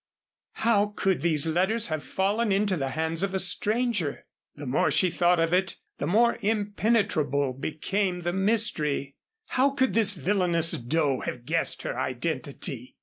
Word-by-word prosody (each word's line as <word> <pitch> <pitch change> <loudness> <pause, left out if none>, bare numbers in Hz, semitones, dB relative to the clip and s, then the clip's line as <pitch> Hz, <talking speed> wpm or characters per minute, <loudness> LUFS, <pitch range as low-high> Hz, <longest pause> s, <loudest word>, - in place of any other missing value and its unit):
How 210 -2 +1
could 190 -2 0
these 160 -3 +1
letters 190 +7 +1
have 155 -1 -3
fallen 205 +3 0
into 195 0 +1
the 135 -5 -2
hands 160 +1 -1
of 195 -1 -1
a - - +2
stranger? 210 - 0 0.3
The 145 - -8
more 130 +2 +1
she 185 -2 +2
thought 175 0 +2
of 165 +1 +1
it 190 +1 +1 0.2
the - - -2
more 235 +6 +3
impenetrable 200 - 0
became 180 +7 -2
the 175 0 -2
mystery. 190 -9 +1 0.4
How 265 +2 +3
could 260 -2 0
this 210 -3 +4
villainous 170 0 +1
Doe 140 +2 0
have 120 -1 -6
guessed 165 +4 -1
her - - -3
identity? 130 -1 -4
180 Hz, 150 wpm, -26 LUFS, 155-210 Hz, 0.4 s, this